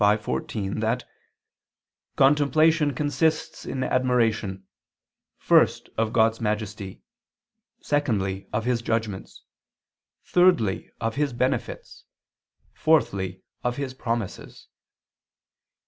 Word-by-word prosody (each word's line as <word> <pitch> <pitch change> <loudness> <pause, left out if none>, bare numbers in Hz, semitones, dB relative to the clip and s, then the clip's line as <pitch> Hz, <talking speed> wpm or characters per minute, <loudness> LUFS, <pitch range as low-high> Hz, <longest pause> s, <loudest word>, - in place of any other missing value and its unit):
v, 105 +1 +5
14) 105 -1 -3
that 115 +3 -1 1.1
"contemplation 150 +2 +4
consists 155 +3 -1
in 130 - -2
admiration 115 -7 +1 0.7
first - - +3
of 110 -1 0
God's 115 0 +2
majesty, 105 -2 -3 0.8
secondly 100 -10 -1
of 110 +1 -2
His 120 -2 +1
judgments, 110 -4 -3 0.8
thirdly 175 - +3
of 115 +2 -2
His 145 -3 0
benefits, 130 0 -3 0.7
fourthly 95 - +1 0.2
of 125 0 -1
His 140 -2 -3
promises." 115 -6 -5
115 Hz, 85 wpm, -25 LUFS, 105-140 Hz, 1.1 s, v